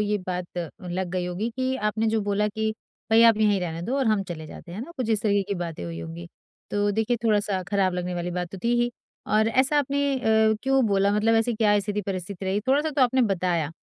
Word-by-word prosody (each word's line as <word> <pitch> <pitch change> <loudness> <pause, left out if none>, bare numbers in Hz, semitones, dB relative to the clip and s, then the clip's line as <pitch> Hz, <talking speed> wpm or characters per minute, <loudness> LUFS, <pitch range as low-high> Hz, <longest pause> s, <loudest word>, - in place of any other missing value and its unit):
ये 210 0 +1
बात 180 -1 -3 0.3
लग 180 +1 -3
गई 180 -1 -2
होगी 185 +6 -3
कि 260 0 0
आपने 215 -1 0
जो 220 - +2
बोला 205 +1 0
कि 220 +1 -2 0.4
भाई 225 +1 +6
आप 230 -2 +7
यहीं 210 -2 +2
रहने 165 -2 -4
दो 245 +9 -2
और 265 - +1
हम 215 -2 +2
चले 160 -2 -6
जाते 170 - -11
हैं 195 - -5
ना। 270 +8 -7
कुछ 255 -4 -2
इस 215 -1 +1
तरह 205 -2 +2
की 200 - -1
बातें 170 - -5
हुई 85 -1 -6
होंगी। 85 +1 -7 0.4
तो 205 0 +1
देखिए 225 +3 +1
थोड़ा-सा 205 -3 +1
खराब 195 -2 +1
लगने 180 0 -3
वाली 175 0 -3
बात 180 0 -3
तो 195 - -7
थी 235 +1 +3
ही 240 0 +1 0.5
और 220 +1 +3
ऐसा 260 +5 +3
आपने 280 0 0
अ, 220 -1 +3
क्यों 270 -1 +3
बोला? 200 -1 +2
मतलब 215 +2 +2
ऐसी 225 +1 +2
क्या 210 -1 +3
स्थिति-परिस्थिति 195 -2 -4
रही? 195 +2 0
थोड़ा-सा 280 +7 +1
तो 275 -2 +2
आपने 255 +1 +3
बताया 170 -4 0
210 Hz, 230 wpm, -25 LUFS, 180-225 Hz, 0.5 s, आप